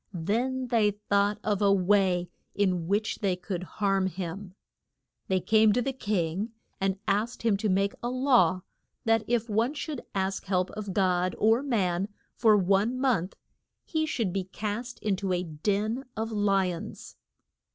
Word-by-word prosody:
Then 245 Hz, +9 st, -1 dB
they 225 Hz, -3 st, +4 dB
thought 205 Hz, 0 st, 0 dB
of 210 Hz, -2 st, 0 dB
a 200 Hz, -1 st, +5 dB
way 190 Hz, -2 st, +3 dB, 0.3 s
in 180 Hz, -4 st, +1 dB
which 205 Hz, +3 st, 0 dB
they 195 Hz, -3 st, +1 dB
could 180 Hz, 0 st, -5 dB
harm 195 Hz, 0 st, 0 dB
him. 185 Hz, +1 st, -6 dB, 0.7 s
They 190 Hz, -1 st, +2 dB
came 215 Hz, +2 st, +4 dB
to 245 Hz, -, +1 dB
the 270 Hz, +2 st, -2 dB
king 205 Hz, -2 st, -2 dB, 0.3 s
and 195 Hz, 0 st, 0 dB
asked 220 Hz, +5 st, 0 dB
him 225 Hz, -3 st, +3 dB
to 210 Hz, +1 st, -1 dB
make 195 Hz, +1 st, +2 dB
a 240 Hz, -, -2 dB
law 255 Hz, -7 st, +3 dB, 0.4 s
that 225 Hz, -1 st, +3 dB
if 235 Hz, -1 st, +1 dB
one 230 Hz, +6 st, +1 dB
should 295 Hz, -3 st, -4 dB
ask 190 Hz, 0 st, -1 dB
help 185 Hz, -1 st, 0 dB
of 205 Hz, -2 st, -5 dB
God 185 Hz, -2 st, +1 dB
or 225 Hz, +3 st, +4 dB
man 195 Hz, -9 st, 0 dB, 0.3 s
for 220 Hz, -3 st, +4 dB
one 200 Hz, +6 st, +2 dB
month, 225 Hz, -9 st, +1 dB, 0.5 s
he 315 Hz, -1 st, -1 dB
should 225 Hz, -, -1 dB
be 195 Hz, -2 st, -1 dB
cast 215 Hz, +5 st, -4 dB
in 205 Hz, -3 st, 0 dB
to 190 Hz, -1 st, -1 dB
a 180 Hz, 0 st, 0 dB
den 205 Hz, -, -1 dB
of 220 Hz, +1 st, -2 dB
li 195 Hz, -3 st, +2 dB
ons. 165 Hz, -, -9 dB
205 Hz, 160 wpm, -28 LUFS, 185-225 Hz, 0.7 s, a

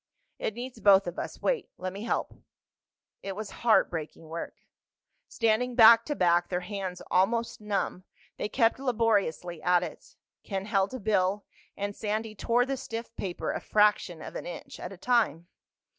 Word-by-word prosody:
"It 220 Hz, -, -2 dB
needs 245 Hz, 0 st, -7 dB
both 195 Hz, -1 st, +6 dB
of 175 Hz, -1 st, -5 dB
us. -, -, -6 dB
Wait—let 265 Hz, -, -2 dB
me 200 Hz, -, -7 dB
help." -, -, -1 dB, 0.9 s
It 195 Hz, -1 st, -5 dB
was 210 Hz, 0 st, -6 dB
heartbreaking 165 Hz, -8 st, +1 dB
work. 165 Hz, +1 st, -5 dB, 0.7 s
Standing 235 Hz, +2 st, +1 dB
back 230 Hz, -1 st, +8 dB
to 295 Hz, -, -2 dB
back, 175 Hz, -3 st, +3 dB
their 180 Hz, -1 st, -1 dB
hands 185 Hz, -1 st, -5 dB
almost 230 Hz, +5 st, +1 dB
numb, 200 Hz, -3 st, -2 dB, 0.3 s
they -, -, -3 dB
kept 230 Hz, 0 st, +2 dB
laboriously 210 Hz, -, 0 dB
at 180 Hz, 0 st, +3 dB
it. -, -, -9 dB, 0.3 s
Ken 195 Hz, -1 st, -4 dB
held 200 Hz, +2 st, +1 dB
a -, -, -5 dB
bill 200 Hz, -1 st, +1 dB, 0.3 s
and 200 Hz, 0 st, -3 dB
Sandy 215 Hz, +1 st, -2 dB
tore 235 Hz, +4 st, +1 dB
the 270 Hz, 0 st, -2 dB
stiff 230 Hz, -1 st, -6 dB
paper 180 Hz, -3 st, -3 dB
a -, -, -4 dB
fraction 210 Hz, -6 st, +2 dB
of -, -, -9 dB
an -, -, -5 dB
inch 175 Hz, -, -8 dB
at 180 Hz, -, -6 dB
a 195 Hz, -, -10 dB
time. 200 Hz, -, +1 dB
205 Hz, 160 wpm, -28 LUFS, 180-230 Hz, 0.9 s, back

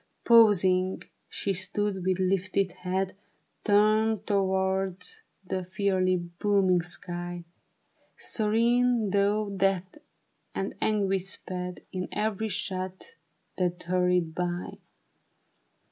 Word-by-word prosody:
Pausing, 190 Hz, -5 st, +5 dB, 0.3 s
she 200 Hz, -, -2 dB
stood 195 Hz, +1 st, -2 dB
with 185 Hz, 0 st, +1 dB
lifted 190 Hz, 0 st, 0 dB
head 185 Hz, +1 st, -3 dB, 0.5 s
Turned 215 Hz, +1 st, +3 dB
towards 190 Hz, -2 st, 0 dB, 0.2 s
that 185 Hz, -1 st, -4 dB
fiery, 185 Hz, -2 st, +2 dB
booming 180 Hz, +1 st, +1 dB
sky. 175 Hz, 0 st, -4 dB, 0.7 s
Serene, 230 Hz, 0 st, +2 dB
though 205 Hz, +1 st, +1 dB
death 195 Hz, +5 st, -1 dB, 0.6 s
and 195 Hz, -, -2 dB
anguish 195 Hz, -3 st, +1 dB
sped 180 Hz, -1 st, -3 dB
In 185 Hz, -1 st, -3 dB
every 220 Hz, 0 st, -1 dB
shot 185 Hz, -, -4 dB, 0.5 s
that 180 Hz, -1 st, -1 dB
hurried 180 Hz, -2 st, +1 dB
by. 175 Hz, +1 st, -3 dB
190 Hz, 90 wpm, -28 LUFS, 180-205 Hz, 0.7 s, Pausing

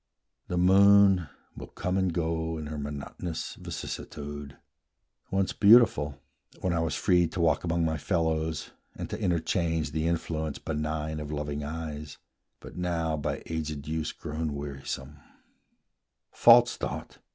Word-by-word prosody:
The 90 Hz, -, -2 dB
moon 95 Hz, -1 st, +6 dB, 0.3 s
will -, -, -8 dB
come 90 Hz, +1 st, -3 dB
and 95 Hz, -2 st, +1 dB
go 80 Hz, -1 st, -1 dB
With 80 Hz, -2 st, -5 dB
her 75 Hz, -, -5 dB
monotonous 75 Hz, +4 st, -5 dB
vicissitude; 75 Hz, -1 st, -7 dB, 0.7 s
Once 95 Hz, 0 st, 0 dB
beautiful, 100 Hz, -, +5 dB, 0.4 s
when 90 Hz, -, 0 dB
I 85 Hz, -, +1 dB
was 80 Hz, -2 st, 0 dB
free 90 Hz, -2 st, +3 dB
to 85 Hz, -, -6 dB
walk 85 Hz, -1 st, +2 dB
Among 85 Hz, -1 st, +1 dB
my 80 Hz, -1 st, -1 dB
fellows, 80 Hz, -3 st, -1 dB, 0.2 s
and -, -, -6 dB
to -, -, -3 dB
interchange 80 Hz, -2 st, 0 dB
The 80 Hz, +2 st, -1 dB
influence 80 Hz, -2 st, -2 dB
benign 75 Hz, 0 st, -3 dB
of 75 Hz, 0 st, -6 dB
loving 75 Hz, -1 st, -3 dB
eyes, 75 Hz, -1 st, -6 dB, 0.4 s
But -, -, -11 dB
now 85 Hz, -3 st, -1 dB
by 75 Hz, -, -3 dB
aged 80 Hz, -2 st, -4 dB
use 80 Hz, 0 st, -2 dB
grown 75 Hz, 0 st, -4 dB
wearisome; 70 Hz, 0 st, -6 dB, 1.1 s
False -, -, +6 dB
thought! -, -, -5 dB
80 Hz, 135 wpm, -28 LUFS, 75-85 Hz, 1.1 s, moon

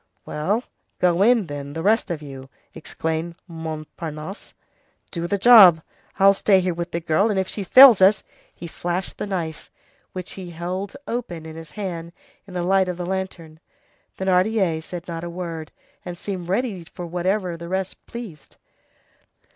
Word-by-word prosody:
"Well, 200 Hz, +11 st, -1 dB, 0.3 s
go 180 Hz, 0 st, +2 dB
in, 230 Hz, -1 st, +4 dB
then, 145 Hz, -2 st, -7 dB
the 160 Hz, +1 st, -4 dB
rest 215 Hz, +1 st, +2 dB
of 160 Hz, -3 st, -4 dB
you," 135 Hz, -2 st, -10 dB, 0.2 s
exclaimed 160 Hz, +2 st, -4 dB
Montparnasse. 160 Hz, +1 st, -7 dB, 0.6 s
"Do 170 Hz, -2 st, -3 dB
the 200 Hz, -, 0 dB
job. 195 Hz, -7 st, +8 dB, 0.3 s
I'll 195 Hz, 0 st, +6 dB
stay 195 Hz, 0 st, +3 dB
here 180 Hz, -1 st, 0 dB
with 170 Hz, +1 st, -4 dB
the 170 Hz, -, -2 dB
girl, 170 Hz, +6 st, +2 dB
and 205 Hz, -, 0 dB
if 190 Hz, -, -1 dB
she 205 Hz, -, -4 dB
fails 255 Hz, 0 st, +9 dB
us—" 195 Hz, +2 st, +5 dB, 0.3 s
He -, -, -10 dB
flashed 175 Hz, +2 st, -4 dB
the -, -, -3 dB
knife, 165 Hz, -5 st, -4 dB, 0.4 s
which 185 Hz, -1 st, -7 dB
he 185 Hz, -2 st, -8 dB
held 180 Hz, +4 st, -5 dB
open 180 Hz, -9 st, -4 dB
in 160 Hz, 0 st, -9 dB
his 160 Hz, -2 st, -11 dB
hand, 170 Hz, -4 st, -5 dB, 0.3 s
in 185 Hz, -, -11 dB
the 175 Hz, -, -1 dB
light 190 Hz, +1 st, +3 dB
of 180 Hz, -, -4 dB
the 175 Hz, -, -4 dB
lantern. 180 Hz, -4 st, -5 dB, 0.6 s
Thénardier 190 Hz, -2 st, +1 dB
said 175 Hz, +1 st, -8 dB
not 165 Hz, -1 st, -5 dB
a 170 Hz, -, -4 dB
word, 170 Hz, -3 st, -6 dB, 0.3 s
and 175 Hz, 0 st, -7 dB
seemed 180 Hz, -2 st, -5 dB
ready 200 Hz, -3 st, -1 dB
for 175 Hz, +1 st, -9 dB
whatever 180 Hz, +1 st, -1 dB
the 170 Hz, 0 st, -8 dB
rest 190 Hz, 0 st, -3 dB
pleased. 225 Hz, -11 st, -9 dB
180 Hz, 165 wpm, -23 LUFS, 165-195 Hz, 0.6 s, fails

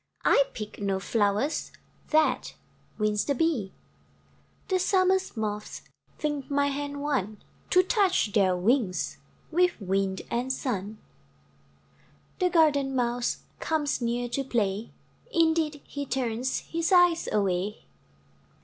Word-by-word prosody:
I -, -, +5 dB
pick 210 Hz, -2 st, -7 dB
no 195 Hz, -1 st, 0 dB
flowers 210 Hz, +7 st, 0 dB, 0.4 s
That 310 Hz, 0 st, +2 dB, 0.4 s
wins 210 Hz, -1 st, +1 dB
the 280 Hz, -, 0 dB
Bee. 255 Hz, -, 0 dB, 1.0 s
The 375 Hz, -2 st, +1 dB
Summer's 375 Hz, -, +2 dB
Moths 210 Hz, -1 st, -4 dB, 0.3 s
Think 295 Hz, -3 st, -3 dB
my 285 Hz, 0 st, +2 dB
hand 285 Hz, 0 st, -4 dB
one 215 Hz, -8 st, -1 dB, 0.3 s
To 365 Hz, 0 st, +5 dB
touch 375 Hz, -, +2 dB
their 190 Hz, -3 st, +3 dB
wings 205 Hz, -1 st, 0 dB, 0.3 s
With 360 Hz, -1 st, +2 dB
Wind 195 Hz, -1 st, -1 dB
and 245 Hz, +2 st, 0 dB
Sun. 215 Hz, -5 st, -3 dB, 1.4 s
The 365 Hz, -1 st, +3 dB
garden 290 Hz, -5 st, +3 dB
Mouse 245 Hz, -1 st, -1 dB, 0.2 s
Comes 300 Hz, -4 st, -1 dB
near 240 Hz, +1 st, -1 dB
to 275 Hz, +3 st, -1 dB
play; 215 Hz, -4 st, -1 dB, 0.4 s
Indeed, 320 Hz, -5 st, +2 dB
he 285 Hz, -1 st, -6 dB
turns 250 Hz, 0 st, -1 dB
His 335 Hz, +1 st, -2 dB
eyes 355 Hz, -2 st, +5 dB
away. 200 Hz, 0 st, -1 dB
260 Hz, 115 wpm, -27 LUFS, 210-315 Hz, 1.4 s, I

